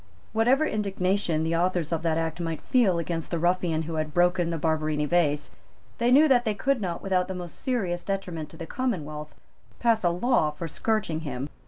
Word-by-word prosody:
Whatever 250 +7 +3
indignation 195 - 0
the 165 +1 0
authors 175 -2 0
of 165 -1 0
that 160 -1 +1
Act 165 +1 -2
might 165 -2 -3
feel 220 -9 +2
against 165 -1 -3
the 170 - -1
ruffian 175 -1 +1
who 160 0 -4
had 155 -1 -7
broken 175 -1 +3
the 165 - -2
Barberini 155 -1 0
Vase, 150 -3 +1 0.5
they 235 +1 +3
knew 290 +5 +7
that 250 -4 +4
they 215 -3 -1
could 270 +3 0
not, 175 -4 -3
without 185 -2 +1
the 190 - -4
most 175 -2 -7
serious 190 -9 -1
detriment 180 -6 -4
to - - -13
the 165 - -6
commonwealth, 155 - -3 0.4
pass 230 -3 +2
a 175 - +4
law 180 -1 +2
for 150 +3 -6
scourging 210 -2 -1
him. 140 -3 -5
175 Hz, 195 wpm, -26 LUFS, 160-205 Hz, 0.5 s, knew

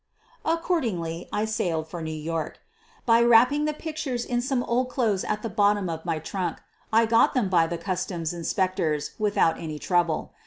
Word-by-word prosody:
Accordingly 230 - -1
I 210 - 0
sailed 170 -7 -1
for 170 +1 -7
New 160 - -4
York. 155 0 -4 0.5
By 230 -1 +5
wrap 235 +1 +6
ping 295 +1 0
the 305 - 0
pictures 295 -7 -4
in 240 -1 0
some 260 -1 0
old 250 +2 0
clothes 225 -7 0
at 210 - -2
the - - -1
bottom 205 -4 +2
of 160 0 -6
my 160 - 0
trunk, 175 +1 -3 0.3
I 225 +1 +5
got 230 +4 +3
them 230 -7 +1
by 170 -3 +4
the 170 - -3
customs 180 -3 -3
inspectors 170 -3 -1
without 205 -6 +2
any 155 -2 -5
trouble. 170 -1 0
195 Hz, 180 wpm, -26 LUFS, 165-235 Hz, 0.5 s, wrap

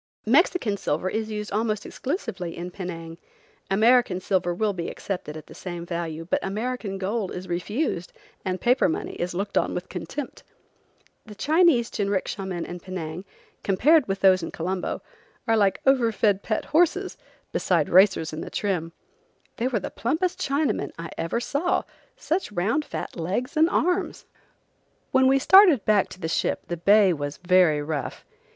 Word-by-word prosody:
Mexican 255 - +3
silver 180 +1 -1
is 220 0 -2
used 210 -1 -5
almost 215 0 -1
exclusively 235 - -4
in 175 +1 -5
Penang. 170 -3 -7 0.5
American 220 -1 +4
silver 185 -1 0
will 205 +4 0
be 170 -2 -4
accepted 180 -6 -5
at 155 - -10
the - - -13
same 175 -2 -6
value, 165 -2 -4
but - - 0
American 215 0 -3
gold 200 +1 -2
is 180 +1 -6
refused 180 - -2 0.3
and 185 -1 -2
paper 250 -3 +3
money - - -3
is 175 0 -2
looked 200 +2 0
on - - -2
with 180 - -5
contempt. 185 - -6 0.9
The 210 - -10
Chinese 300 - +3
jinricksha 200 -1 -2
men 175 -3 -3
in 175 - -7
Penang, 180 -1 -6 0.4
compared 265 - +4
with 195 0 -2
those 185 -1 +5
in 165 - -4
Colombo, 180 +2 -3 0.4
are 225 - +4
like 200 -3 +2
over 255 -4 +4
fed 205 -2 +2
pet 215 - -2
horses 355 +4 +2 0.4
besides 170 -5 +1
racers 185 -4 +4
in 155 - -5
trim. 175 -5 -2 0.6
They 235 - 0
were 245 -4 0
the - - -6
plumpest 325 +9 -1
Chinamen 280 +2 0
I 165 -1 -7
ever 165 +8 -2
saw; 285 +8 0 0.3
such 370 - -2
round 210 +11 0
fat - - -6
legs 190 - -3
and 315 +2 +4
arms! 360 +2 0 0.9
When 260 0 +4
we 270 +1 +5
started 345 - +6
back 210 -2 +3
to - - -11
the 160 - -3
ship 160 - -1
the 175 - -2
bay 200 +2 +5
was 145 -2 -4
very 175 -4 +3
rough. 150 -1 -4
195 Hz, 160 wpm, -25 LUFS, 175-245 Hz, 0.9 s, started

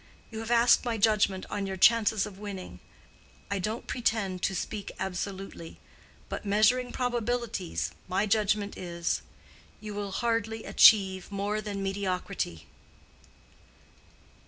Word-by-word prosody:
You 220 - -6
have 225 0 -5
asked 240 0 +5
my 235 -3 -1
judgment 200 -3 +2
on 200 -1 -2
your 190 0 -4
chances 220 0 +4
of 195 -2 -10
winning. 200 -3 -7 0.7
I 200 - 0
don't 215 +5 -3
pretend 210 -7 -1
to 190 - 0
speak 205 +2 -4
absolutely; 190 -2 -5 0.5
but - - -5
measuring 220 +5 +3
probabilities, 235 - -2 0.2
my 190 +3 +1
judgment 210 -1 +1
is:—you 175 +4 -6
will 205 -1 -4
hardly 225 -1 -1
achieve 190 -3 +5
more 205 +2 -1
than 200 -2 -4
mediocrity." 190 - -3
205 Hz, 115 wpm, -29 LUFS, 190-225 Hz, 0.7 s, asked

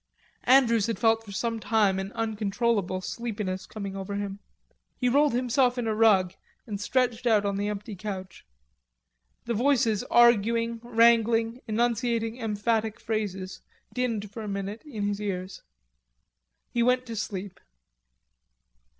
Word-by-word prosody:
Andrews 235 -5 +5
had 230 -3 -2
felt 225 +1 +2
for 205 - -11
some 230 +3 -2
time 210 -4 +2
an 195 +1 -5
uncontrollable 215 -3 -1
sleepiness 200 -2 -4
coming 200 -3 -6
over 195 +1 -5
him. 200 -1 -4 0.6
He 250 - 0
rolled 285 +3 +3
himself 250 +1 +2
on 245 - -1
a 220 - 0
rug 205 -5 +4 0.3
and 205 -2 -5
stretched 245 +1 0
out 215 -3 +3
on 200 -1 0
the 200 +1 -1
empty 210 0 -5
couch. 190 -2 -7 1.0
The 235 - -1
voices 235 -3 +2
arguing, 230 0 +3
wrangling, 230 0 +3
enunciating 230 +1 0
emphatic 220 0 -1
phrases, 200 -4 -4 0.3
dinned 225 -5 -2
for 225 - -7
a 215 - -6
minute 200 +2 -4
in 225 -9 -5
his 205 0 -2
ears. 190 -2 -4 1.1
He 240 - 0
went 250 +1 +2
to 230 -2 -6
sleep. 200 -2 -5
225 Hz, 135 wpm, -27 LUFS, 200-235 Hz, 1.1 s, Andrews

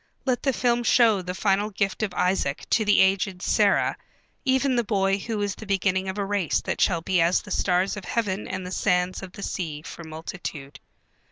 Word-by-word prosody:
Let 255 -2 0
the 270 - +2
film 240 -1 +1
show 230 -4 +4
the 180 0 -5
final 200 +1 +1
gift 200 +1 -2
of 215 -3 -1
Isaac 180 -6 0
to 220 - +3
the 210 -1 +4
aged 190 -1 +1
Sarah, - - +2 0.5
even 265 0 +2
the 240 - +2
boy 195 -2 +1
who 220 +1 -3
is 200 -1 -1
the 220 - -11
beginning 190 -1 0
of 190 - -5
a 200 - -1
race 195 -5 0
that - - -3
shall 170 -4 +2
be 180 +1 +1
as 170 +2 +2
the 205 - -11
stars 185 +2 +1
of 210 - -8
heaven 210 -3 -2
and 190 -1 -4
the 180 - -6
sands 180 0 0
of 190 -1 -9
the 200 - -8
sea 155 -5 -4
for 170 - -9
multitude. 160 -3 -7
195 Hz, 205 wpm, -25 LUFS, 180-210 Hz, 0.5 s, show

